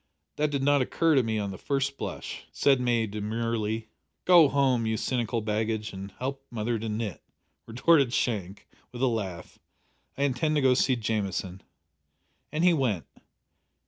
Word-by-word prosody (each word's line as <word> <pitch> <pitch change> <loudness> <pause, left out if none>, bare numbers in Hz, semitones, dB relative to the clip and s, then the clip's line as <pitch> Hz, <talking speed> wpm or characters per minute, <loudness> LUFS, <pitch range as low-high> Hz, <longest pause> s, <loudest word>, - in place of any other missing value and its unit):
That 150 0 +1
did 140 -2 -1
not 145 0 +4
occur 165 +5 +2
to 135 - +5
me 110 -2 -1
at 100 -2 -2
the 95 - -8
first 140 0 -1
blush!" - - -6
said 135 -2 +3
May 120 -2 +2
demurely. 110 +1 -2 0.4
"Go 175 -4 +7
home, 130 -5 +2
you 110 0 0
cynical 120 -1 -1
baggage, 110 0 -2
and 95 +1 -7
help 135 +1 -4
mother 115 0 -2
to 110 +1 -4
knit," 105 -4 -4 0.5
retorted 130 +3 +3
Shank, 105 -6 -2 0.2
with 125 +1 -5
a - - +6
laugh. 100 -8 -3 0.6
"I 140 - 0
intend 140 +3 +1
to 150 - +2
go 130 - +5
and 125 - +4
see 130 - +3
Jamieson." 100 -5 -2 0.9
And 155 +3 -1
he 180 -1 +6
went. 115 - 0
115 Hz, 165 wpm, -27 LUFS, 110-135 Hz, 0.9 s, Go